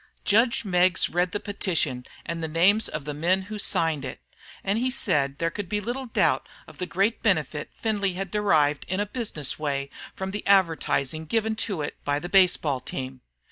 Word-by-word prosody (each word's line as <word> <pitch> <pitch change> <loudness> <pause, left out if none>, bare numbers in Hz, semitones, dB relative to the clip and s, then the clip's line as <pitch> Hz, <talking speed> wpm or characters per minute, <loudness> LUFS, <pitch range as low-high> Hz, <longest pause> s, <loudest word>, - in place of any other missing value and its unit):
Judge 230 +2 +3
Meggs 180 -2 +3
read 175 +1 +1
the 205 - -2
petition 160 -12 -1 0.2
and 170 0 -4
names, 175 +7 +3
of 150 -2 -5
the 150 - -3
men 175 +6 +1
who 205 +3 -9
had 210 - -1
signed 160 -6 +2
it; - - -6 0.4
and 200 +3 +1
he 255 +2 +1
said 145 - +1
there 165 +2 0
could 195 0 -5
be 210 - 0
little 245 +5 -4
doubt - - +1 0.2
of - - -15
the 180 - -2
great 195 +6 0
benefit 155 -7 0
Findlay 205 -4 0
had 190 0 -5
derived 155 -9 +2
in 190 +2 -1
a 205 - +1
business 205 - -2
way 140 -2 -2 0.2
from 190 0 -4
the 205 +1 -4
advertising 160 -5 +2
given 220 +3 0
to 195 -8 -1
it - - -5
by 145 0 0
the 175 +4 -5
baseball 180 -8 +4
team. 130 0 -6
180 Hz, 190 wpm, -26 LUFS, 150-205 Hz, 0.4 s, baseball